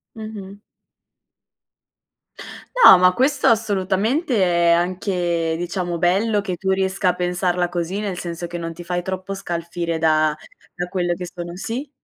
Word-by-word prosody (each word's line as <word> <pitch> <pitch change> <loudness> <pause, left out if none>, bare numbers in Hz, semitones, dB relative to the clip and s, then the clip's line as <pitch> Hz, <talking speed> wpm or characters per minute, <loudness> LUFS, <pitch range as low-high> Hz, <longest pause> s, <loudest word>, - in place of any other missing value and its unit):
Mh-mh. 215 -3 -8 2.3
No, 185 - +11
ma 180 0 +4
questo, 270 +5 +1
assolutamente, 220 - +1
è 170 -1 +3
anche, 175 -2 0
diciamo, 175 0 -3
bello 200 +5 +2
che 185 -3 -4
tu 190 +2 -1
riesca 190 0 0
a - - +2
pensarla 180 0 0
così. 175 +3 -3
Nel 200 -4 -3
senso 170 0 -5
che 175 - -6
non 165 -1 -5
ti 175 +1 -10
fai 175 0 -2
troppo 190 +2 -5
scalfire 170 -3 -4
da 155 -1 +2 0.4
da 175 0 -2
quello 175 -1 -1
che 180 +1 -6
sono 175 0 -7
sì? 240 +9 -5
180 Hz, 145 wpm, -21 LUFS, 175-195 Hz, 2.3 s, No